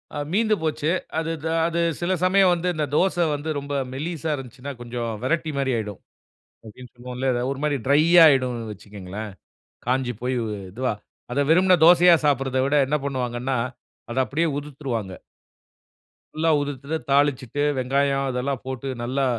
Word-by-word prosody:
அ - - -3 0.2
மீந்து 215 +1 +3
போச்சு. 155 -1 -1 0.3
அது 165 0 -2
த - - -2 0.2
அது 170 0 -1 0.2
சில 175 +2 0
சமயம் 185 0 +5
வந்து, 175 +1 -2
அந்த 155 -1 0
தோச 190 +3 +2 0.2
வந்து 145 +2 -5
ரொம்ப 140 +1 -6 0.2
மெல்லிசா 160 +2 -4
இருந்துச்சுன்னா, 135 +1 -8
கொஞ்சம் 120 -1 -4
வரட்டிமாரி 140 -2 0
ஆயிடும். 105 -3 -5 0.7
அப்பிடின்னு 120 +3 -12
சொல்லுவோம்ல. 125 +2 -3
எத 120 - -1
1 140 - -7
மாரி 150 -1 +1
ட்ரையாயிடும்னு 140 -6 +5
வச்சுக்கங்களேன். 100 +1 -8 0.6
காஞ்சு 125 -1 0
போய் 125 +1 -1
வ் 105 - -3 0.2
இதுவா. 125 +2 -1 0.4
அத 140 - -1
வெறுமன 180 +2 +5
தோசயா 175 0 +7
சாப்பிடுறத 135 -2 +1
விட 140 - +1
என்ன 150 - +1
பண்ணுவாங்கன்னா, 130 -1 -2 0.5
அத 120 - -5
அப்பிடியே 160 +6 0
உதிர்த்துருவாங்க. 135 -9 -4 1.2
ஃபுல்லா 160 +1 +1
உதிர்த்துட்டு 145 +2 -4
தாளிச்சுட்டு 140 -1 +1 0.2
வெங்காயம் 135 +1 +1
இதெல்லாம் 125 +1 -2
போட்டு, 130 +1 -5 0.2
நல்லா 135 +3 0
140 Hz, 140 wpm, -23 LUFS, 125-155 Hz, 1.2 s, தோசயா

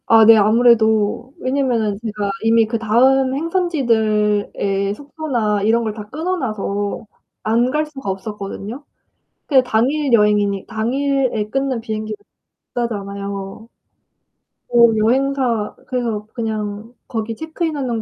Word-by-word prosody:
아 225 -1 +7
네. 225 +1 +9
아무래도 220 +2 +3
왜냐면은 250 -6 0
제가 210 -2 -2
이미 225 0 +4
그다음 245 +4 +3
행선지들에 215 - 0
숙소나 250 -7 -2
이런 230 +2 +3
걸 215 -2 -2
다 210 -1 -7
끊어 325 +8 -2
놔서 205 - -3 0.4
안 235 +3 +2
갈 305 +2 0
수가 275 -7 -7
없었거든요. 205 +5 -6 0.6
그게 265 -4 +5
당일 265 +5 +1
여행이니 210 -3 +3
당일에 250 -1 -1
끊는 270 -1 -1
비행기는 215 -1 -4 0.6
비싸잖아요. 200 -2 -4 1.0
어 - - -16 0.2
여행사 245 -1 +1
그래서 235 -5 -2
그냥 215 -1 -4
거기 225 -1 -3
체크인하는 300 -6 -3
225 Hz, 265 characters per minute, -19 LUFS, 210-265 Hz, 1.0 s, 네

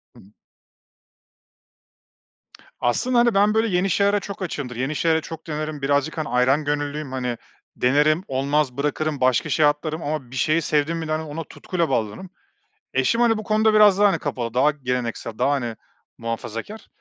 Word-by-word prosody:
Hı - - -15
hı. 100 - -19 2.5
Aslında, 240 - +1
hani, 235 -2 +4
ben 205 +2 +4
böyle 220 +1 +2
yeni 185 0 +1
şeylere 200 +3 +2
çok 200 0 -8
açığımdır, 145 -8 -4
yeni 130 +5 -2
şeyleri 160 0 +2
çok 165 0 -9
denerim 155 -1 -4
birazcık, 145 +3 0
hani, 155 - -3
ayran 130 +4 +2
gönüllüyüm, 145 -1 -2
hani, 125 -3 -3 0.4
denerim 150 +7 +2
olmaz 135 0 0
bırakırım 150 0 -1
başka 130 +5 +2
şeye 150 +2 +3
atlarım 155 +2 0
ama 145 -4 -4
bir - - -8
şeyi 155 +5 +2
sevdim 150 +2 0
mi 165 -1 -4
de, 155 - -4
hani, 155 +1 -1
ona 160 +2 -6
tutkuyla 170 +2 -3
bağlanırım. 115 - -2 0.6
Eşim, 230 - +1
hani, 230 -2 +3
bu 215 - -4
konuda 215 +1 +2
biraz 205 -2 +6
daha, 205 0 +6
hani, - - +1
kapalı 120 -5 -4
daha 140 +4 +4
geleneksel 125 -5 -4
daha, 140 - +2
hani, 120 -5 -2 0.4
muhafazakâr. 115 - -6
150 Hz, 170 wpm, -23 LUFS, 130-175 Hz, 2.5 s, biraz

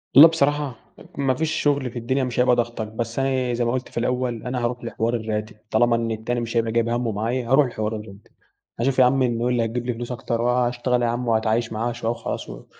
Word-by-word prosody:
والله 150 +4 +12
بصراحة، 145 -4 0 0.4
ما 135 -2 +2
فيش 160 +4 -1
شغل 140 -5 +1
في 120 - -5
الدنيا 130 +3 0
مش 125 -1 -2
هيبقى 125 0 +5
ضاغطك، 115 -2 -2
بس 115 +2 -4
أنا 130 -2 0
زي 120 0 0
ما 120 - +1
قلت 130 0 -3
في - - -11
الأول 120 -1 -1
أنا 125 -1 -3
هاروح 120 0 -2
لحوار 115 0 -1
الراتب، 110 -1 -3 0.2
طالما 120 +1 +4
إن 115 -1 -1
التاني 110 +2 -2
مش 115 0 -3
هيبقى 115 -1 +1
جايب 115 0 +1
همه 120 -1 0
معايا 115 +4 -2
هاروح 135 +1 +5
لحوار 110 -2 -3
الراتب. 105 -1 -10 0.5
هاشوف 130 +2 +1
يا 125 - +8
عمي 130 +1 +3
انهون 120 0 0
اللي 120 -2 +2
هيجيب 120 +2 -3
لي 125 - -1
فلوس 120 +2 -6
أكتر 120 -1 -2
وهاشتغل 125 0 +1
يا 120 - +2
عم 120 +1 -2
وهاتعايش 110 +1 +1
معاها 115 +2 -1
شوية 115 -1 -2
وخلاص 120 - -5
و - - -9
120 Hz, 230 wpm, -23 LUFS, 115-125 Hz, 0.5 s, والله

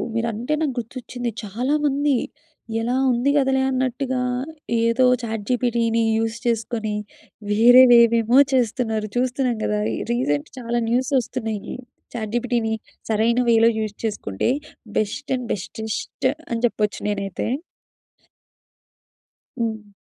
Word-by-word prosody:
మీరంటే 230 +4 -1
నాకు 290 -5 0
గుర్తొచ్చింది. 245 +1 -5
చాలామంది 280 +6 +1 0.7
ఎలా 245 +2 0 0.2
ఉంది 245 +3 +1
కదలే 265 -1 +2
అన్నట్టుగా, 260 0 -1 0.6
ఏదో 230 +3 +3 0.2
చాట్‌జీపీటీ‌ని 230 +1 0
యూస్ 225 +1 -1
చేసుకొని 225 -2 -1 0.6
వేరే 240 +4 +8
వేవేమో 235 +1 +5 0.2
చేస్తున్నారు. 225 -3 0
చూస్తున్నాం 250 0 0
గదా! 210 0 0 0.3
రీసెంట్ 145 - 0
చాలా 240 0 -1
న్యూసొస్తున్నాయి. 245 -4 -1 0.4
చాట్‌జీపీటీ‌ని 230 0 -1 0.4
సరైన 225 +3 +2
వేలో 230 0 +6
యూస్ 215 -1 -3
చేసుకుంటే, 210 - -1 0.5
బెస్ట్ 215 +7 -2
అండ్ 250 -2 -5
బెటెస్ట్ 220 +5 -3 0.2
అని 230 - -1
చెప్పొచ్చు 210 -2 -2
నేనైతే. 195 -2 -3 2.1
హ్మ్. 220 -2 -3
235 Hz, 95 wpm, -22 LUFS, 220-250 Hz, 2.1 s, వేరే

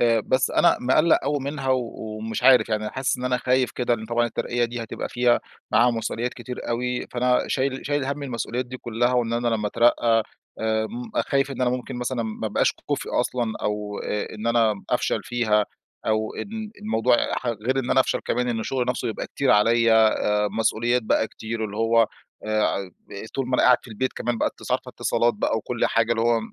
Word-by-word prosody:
آآ 115 -1 +4
بس 130 +4 +1
أنا - - +4
مقَلَّق 155 +6 +4
أوي 145 +1 0
منها، 140 0 -4
و 125 -3 0 0.3
ومش 110 +1 -4
عارف، 130 -1 +6
يعني 110 -1 -1
حاسس 130 -1 -1
إن 125 - -5
أنا 125 0 +1
خايف 125 0 +1
كده، 120 -1 0
لإن 110 -1 -7
طبعًا 120 +1 +1
الترقية 120 +1 -1
دي 120 0 -4
هتبقى 115 - -5
فيها 120 0 +2 0.3
معاها 120 +1 +5
مسؤوليات 115 +1 -3
كتير 125 -1 -7
أوي، 125 +1 -1
فأنا 125 0 +2
شايل 135 0 0
شايل 145 -1 0
هَم 140 +2 -3
المسؤوليات 125 -1 -3
دي 130 +1 -7
كلّها، 120 0 0
وإن 120 -2 +1
أنا 120 0 0
لمّا 110 -2 0
أترقى 115 0 +3 0.4
آآ، 110 0 0
م 240 0 -7 0.2
خايف 140 0 +1
إن 135 - -6
أنا 125 -1 +2
ممكن 125 0 -4
مثلًا 125 0 -2
ما 110 -1 -4
ابقاش - - +2
كُفْء - - -2
أصلًا، 120 -3 -1
أو، 105 0 -2
آآ، 105 +1 -3
إن 110 +1 -6
أنا 115 -2 +3 0.2
أفشل - - +1
فيها 110 -3 +1 0.4
أو 110 0 0
إن 205 - -6
إن 220 -1 -5
الموضوع 125 - +2 0.2
ح - - -4
غير 120 +3 -1
إن 130 -1 -2
أنا 130 - +5
أفشل - - 0
كمان، 125 0 -1
إن 115 -2 -1
الشغل 125 +2 -1
نفسه 125 - -1
يبقى 110 - -4
كتير 140 - 0
عليَّ، 115 +2 +4
آآ 105 -1 +3
مسؤوليات 120 +2 +1
بقى 110 - +1
كتير 110 0 -5
اللي 105 -1 -6
هوّ، 115 0 +4 0.4
آآ، 110 0 +1
ع 95 -1 0 0.5
طول 135 -2 -2
ما 130 - 0
أنا - - +3
قاعد 125 - +7
في - - -14
البيت، 120 +4 -2
كمان 120 -2 -2
بقى - - +2
اتص - - -12
عارفة - - -1
اتصالات 120 -1 +1
بقى 105 - 0
وكل 115 +2 -1
حاجة 115 0 +1
اللي 115 - 0
هوّ 115 0 +3
120 Hz, 210 wpm, -24 LUFS, 110-125 Hz, 0.5 s, قاعد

